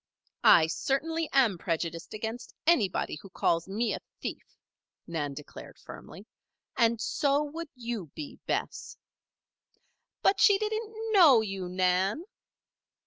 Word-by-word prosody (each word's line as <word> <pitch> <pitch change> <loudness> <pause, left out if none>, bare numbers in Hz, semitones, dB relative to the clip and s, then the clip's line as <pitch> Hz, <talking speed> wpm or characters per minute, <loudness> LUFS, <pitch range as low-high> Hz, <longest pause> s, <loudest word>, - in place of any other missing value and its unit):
"I 160 - +7
certainly 305 - -1
am 235 -10 +3
prejudiced 165 -1 -3
against 225 +3 -6
anybody 210 - +1
who 195 - -12
calls 170 -1 0
me 220 +5 -1
a - - -4 0.2
thief," - - -7 0.5
Nan 150 -5 -3
declared 150 - -11
firmly. - - -12 0.5
"And 230 -1 +2
so 285 +4 +1
would 320 +2 -6
you 235 -7 -5
be, 150 - -8
Bess." - - -3 1.3
"But 390 - +3
she 405 -3 +6
didn't 435 +1 -3 0.2
know 320 - +7
you, 195 -4 -4
Nan." 185 - +1
225 Hz, 120 wpm, -29 LUFS, 180-300 Hz, 1.3 s, I